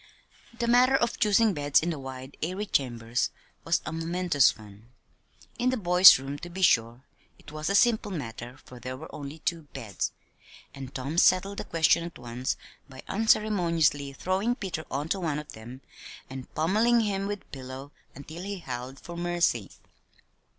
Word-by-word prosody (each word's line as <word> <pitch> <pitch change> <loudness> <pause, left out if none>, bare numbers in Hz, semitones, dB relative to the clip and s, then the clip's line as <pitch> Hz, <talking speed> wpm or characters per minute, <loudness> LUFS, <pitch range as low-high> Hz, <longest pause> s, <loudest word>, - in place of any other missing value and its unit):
The 235 - -1
matter 250 +3 +5
of 235 -3 0
choosing 215 -1 +4
beds 145 -3 +3
in 170 +2 -1
the 155 - -5
wide, 130 0 -8
airy 185 +6 -2
chambers 120 - -1 0.3
was 165 - +1
a 155 - -4
momentous 165 -4 +2
one. 105 +1 -15 0.7
In 250 - +2
the 255 - 0
boys' 180 -2 +8
room, 135 +2 -6
to 175 - -8
be 190 +2 -4
sure, 120 -4 +3 0.3
it - - -14
was 155 +1 -3
a 200 - +1
simple 220 0 +3
matter, 125 - -6
for 125 - -12
there 130 +2 -6
were 155 - -11
only 145 +1 -7
two 160 -1 -3
beds, 110 -8 -3 0.6
and 135 -1 -9
Tom 140 +6 -1
settled 195 +3 +3
the - - -5
question 165 0 +3
at 170 0 -8
once 120 +2 -3 0.3
by 130 -1 -11
unceremoniously 170 -10 +2
throwing 190 - 0
Peter 185 -8 -5
on 140 +3 -3
to 195 - 0
one 160 -5 -1
of 150 0 -7
them, 120 +4 -11 0.5
and 130 -1 -8
pommeling 220 +9 +3
him 200 -2 -1
with 205 -1 -4
the - - -27
pillow 135 +1 -8 0.2
until 155 +4 -9
he 200 +1 -4
howled 130 -4 -7
for 170 - -9
mercy. 170 - 0
160 Hz, 170 wpm, -27 LUFS, 130-190 Hz, 0.7 s, boys